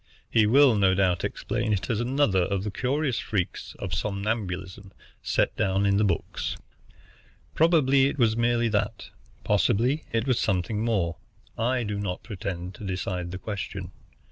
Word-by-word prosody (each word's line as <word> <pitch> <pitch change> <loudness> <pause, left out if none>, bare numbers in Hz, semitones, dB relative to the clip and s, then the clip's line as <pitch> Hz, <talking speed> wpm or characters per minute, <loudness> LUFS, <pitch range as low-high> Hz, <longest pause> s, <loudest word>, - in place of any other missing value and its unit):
He 110 -2 +4
will 135 +2 +6
no 95 -3 +3
doubt 90 -2 +1
explain 110 - -1
it 95 -2 -1
as 115 -4 0
another 120 -6 +2
of 95 +2 -1
the 105 - -3
curious 130 +3 0
freaks 95 -5 -3
of - - -5
somnambulism 100 -2 -3 0.3
set - - 0
down 95 +1 +1
in 100 0 +3
the 105 - +3
books. 95 -5 -2 1.0
Probably 140 -5 +4
it 140 - -3
was 115 -4 +3
merely 120 0 +2
that, 105 -2 -2 0.3
possibly 125 +9 +2
it 115 0 0
was 130 -3 +1
something 105 +2 0
more. 95 -8 0 0.4
I 125 +2 0
do 105 -2 -3
not 90 -3 -3
pretend 95 -3 -5
to - - -11
decide 90 -2 -3
the 90 - -5
question. 100 -2 -5
105 Hz, 155 wpm, -26 LUFS, 95-120 Hz, 1.0 s, will